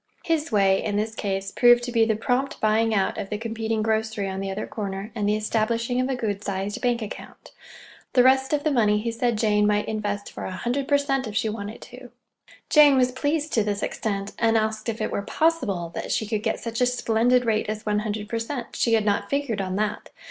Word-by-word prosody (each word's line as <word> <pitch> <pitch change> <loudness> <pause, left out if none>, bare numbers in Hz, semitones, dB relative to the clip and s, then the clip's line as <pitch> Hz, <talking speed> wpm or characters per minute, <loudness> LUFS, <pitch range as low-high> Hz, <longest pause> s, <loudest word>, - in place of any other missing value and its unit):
"His 325 -3 0
way" 195 -2 +3
in 205 - -2
this 215 +2 -1
case 195 -2 -3
proved 240 0 +5
to 245 - -4
be 230 -2 +4
the 220 -1 +1
prompt 250 +5 -1
buying 220 +1 +2
out 195 -3 0
of 195 - -5
the 210 - -2
competing 225 0 -2
grocery 220 -2 -1
on 190 0 -4
the 195 0 -3
other 195 +2 -3
corner, 200 0 -5
and 205 -3 -1
the 210 - +2
establishing 230 +3 0
of 260 0 -1
good 210 -4 -3
sized 195 +1 -3
bank 240 -2 +1
account. 215 - -10 0.6
The 250 - +6
rest 265 +1 +4
of 295 -1 0
the 310 - +1
money 210 -5 +3
he 230 +2 -2
said 230 0 0
Jane 210 -1 +2
might 210 0 +1
invest 205 -2 -3
for - - -7
a - - -4
hundred 265 +5 -2
per 285 - +4
cent, 270 -3 -1
if 210 - -7
she 225 -2 +1
wanted 210 0 -6
to. 250 0 -12 0.6
Jane 295 -3 +6
was 250 -1 +3
pleased 290 +4 -1
to 220 - +3
this 205 -1 -2
extent, 200 -2 -3
and 230 -1 +3
asked 220 +1 -1
if 220 -1 -4
it 215 - -1
were - - -1
possible 200 - 0
that - - -4
she 220 - 0
could 215 0 -2
get 220 0 -1
such 230 +1 -4
a 250 - +4
splendid 245 0 +2
rate 215 -2 0
as 215 0 -4
one 210 -1 +1
hundred 210 0 -4
per 230 +1 -2
cent. 240 +1 -5
She 230 - +1
had 220 -2 +3
not 200 -1 0
figured 280 -7 -1
on 185 -1 -3
that! 210 +1 -2
220 Hz, 230 wpm, -24 LUFS, 210-245 Hz, 0.6 s, The